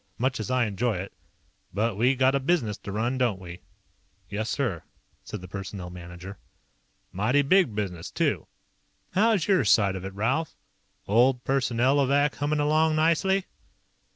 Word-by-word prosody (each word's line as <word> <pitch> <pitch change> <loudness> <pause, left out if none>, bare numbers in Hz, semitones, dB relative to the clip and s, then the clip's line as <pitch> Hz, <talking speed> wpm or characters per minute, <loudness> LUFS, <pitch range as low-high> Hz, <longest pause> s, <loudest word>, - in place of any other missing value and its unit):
Much 130 0 0
as 110 - -4
I 130 -1 +2
enjoy 110 +2 -1
it. 95 +2 -6 0.6
But 110 +2 0
we 125 +6 +3
got 130 +1 +3
a 140 - +2
business 135 -7 0
to 100 - -7
run, 120 +5 -1
don't 120 -7 +1
we?" 90 -1 -9 0.7
"Yes, 105 +2 -2
sir," 110 - -1 0.4
said - - -7
the 90 - -9
Personnel 95 -1 -7
Manager. 90 +2 -10 0.7
"Mighty 125 +9 +2
big 160 - +3
business, 90 -5 -4
too. - - -1 0.6
How's 210 -3 +2
your 190 -7 +4
side 100 -3 +3
of 95 - -6
it, 95 0 -7
Ralph? 130 +10 -1 0.5
Old 125 +4 +3
Personnelovac 135 +2 +2
hummin' 145 +1 0
along 155 +2 +2
nicely?" 170 +5 +2
120 Hz, 150 wpm, -26 LUFS, 100-145 Hz, 0.7 s, your